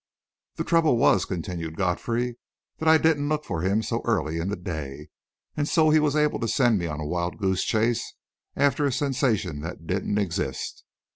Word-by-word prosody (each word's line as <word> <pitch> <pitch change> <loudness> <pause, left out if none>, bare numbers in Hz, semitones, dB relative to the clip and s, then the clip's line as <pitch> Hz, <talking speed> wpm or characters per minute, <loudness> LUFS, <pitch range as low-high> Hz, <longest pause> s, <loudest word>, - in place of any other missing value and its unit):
"The - - -2
trouble 165 -7 +3
was," - - +4
continued 85 -3 -5
Godfrey, 115 +6 -1 0.4
"that 160 - +2
I 160 - +8
didn't 155 -2 +2
look 150 0 -1
for 80 - -3
him 100 +5 +1
so 115 +1 -2
early 85 -8 0
in 85 +3 -2
the 100 - -1
day, 75 -5 -6 0.5
and 145 -1 -1
so 155 -2 +4
he 155 - +6
was 150 -1 +1
able 150 -1 +2
to 115 - -1
send 120 -3 +3
me 85 - -2
on 75 -2 -4
a 75 - -4
wild 85 +3 -2
goose 95 -1 0
chase 115 +2 0 0.4
after 140 +1 +2
a - - 0
sensation 120 - 0
that 85 +1 -7
didn't 95 +3 -1
exist. 85 -9 -3
105 Hz, 190 wpm, -25 LUFS, 85-140 Hz, 0.5 s, I